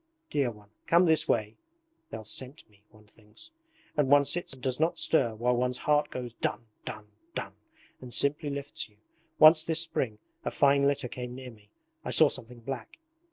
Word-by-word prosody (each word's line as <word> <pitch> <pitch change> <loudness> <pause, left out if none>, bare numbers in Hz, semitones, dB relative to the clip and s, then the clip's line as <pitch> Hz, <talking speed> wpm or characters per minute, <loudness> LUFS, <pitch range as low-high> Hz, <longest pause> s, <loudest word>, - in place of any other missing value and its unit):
Dear 140 -4 +1
one, 105 -2 -14 0.2
come 170 +2 +5
this 160 -1 +3
way! 110 -1 0 0.5
"They'll 110 -1 -7
scent 130 +6 -7
me," 105 -1 -27
one 110 0 -20
thinks; 105 - -13 0.4
and 145 -3 +2
one 145 0 +6
sits 175 +5 -1
and 135 - -13
does 130 0 -1
not 160 +2 +1
stir 115 -8 +2
while 120 +3 +1
one's 125 +1 0
heart 150 0 +3
goes 125 -2 -6
dun! 115 - -3 0.2
dun! 105 -1 -7 0.3
dun! - - -4 0.5
and 125 -1 -9
simply 145 +3 +2
lifts 140 -4 -4
you. 105 - -29 0.4
Once 155 +1 +8
this 165 0 +1
spring 130 -9 -1 0.3
a - - -1
fine 140 0 +3
litter 140 -3 0
came 125 0 -7
near 130 -1 -8
me, 105 -2 -20 0.3
I - - -5
saw - - +6
something 120 +1 -8
black. 125 -2 -6
125 Hz, 185 wpm, -29 LUFS, 115-145 Hz, 0.5 s, Once